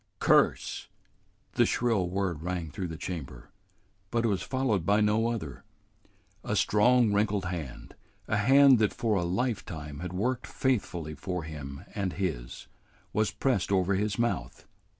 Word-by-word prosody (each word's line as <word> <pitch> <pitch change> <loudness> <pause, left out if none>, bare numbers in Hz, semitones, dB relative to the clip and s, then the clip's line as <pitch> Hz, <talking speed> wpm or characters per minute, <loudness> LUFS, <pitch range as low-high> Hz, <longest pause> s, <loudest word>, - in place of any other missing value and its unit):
"Curse - - +2 0.3
" - - -40
The - - +5
shrill 110 -7 +1
word 90 -4 -2
rang 85 -2 -3
through 95 +1 -4
the 80 -1 -7
chamber, 75 -9 -7 0.6
but 115 +1 0
it - - +3
was 95 -3 0
followed 130 -8 0
by 100 +5 +3
no 105 +2 +2
other. 100 - -4 0.8
A - - -1
strong, 120 +1 +4
wrinkled 100 -2 +1
hand, 85 -8 -6 0.3
a 110 - +1
hand 135 +3 +6
that 110 -2 +2
for 115 -2 0
a 90 - +1
lifetime 85 - -3
had 90 +1 -5
worked 120 +7 -1
faithfully 90 - -1
for 85 +4 -4
him 70 -3 -7
and 95 -3 -2
his, 80 -12 -4 0.5
was 110 0 +2
pressed 120 -9 0
over 95 0 +2
his 100 +1 0
mouth. 115 - -2
100 Hz, 150 wpm, -29 LUFS, 85-110 Hz, 0.8 s, hand